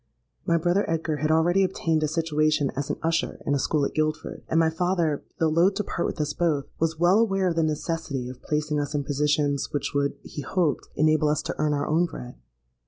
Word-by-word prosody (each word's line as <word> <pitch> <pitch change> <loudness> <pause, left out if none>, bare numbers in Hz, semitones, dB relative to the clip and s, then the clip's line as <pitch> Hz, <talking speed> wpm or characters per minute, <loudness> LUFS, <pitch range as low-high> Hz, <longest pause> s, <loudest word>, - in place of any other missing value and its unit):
My 170 - +3
brother 175 +4 +2
Edgar 160 -1 -1
had 155 +2 -1
already 170 +4 +3
obtained 165 -4 0
a 155 - +1
situation 155 -2 +1
as 140 +1 -3
an - - 0
usher 165 +1 0
in 140 - +1
a 140 - +1
school 145 +1 +1
at - - -3
Guildford, 155 0 -2
and 160 - +3
my 160 -1 +3
father, 170 -3 0 0.2
though 165 - +2
loth 170 +5 +3
to 210 - -1
part 170 - -2
with - - -5
us 150 -1 -1
both, 150 -5 0
was 165 0 0
well 175 +5 +4
aware 195 -4 +2
of 170 - -2
the 165 - +2
necessity 155 -4 -2
of 125 0 -9
placing 150 0 -1
us 145 +1 -3
in 145 - 0
positions 145 0 0
which 145 - -2
would, 140 0 0
he 150 - -7
hoped, 160 +1 -1
enable 155 0 +3
us 150 - 0
to - - -4
earn 150 -1 +1
our 145 - -1
own 165 +3 +2
bread. 125 -6 -8
155 Hz, 225 wpm, -25 LUFS, 145-165 Hz, 0.2 s, well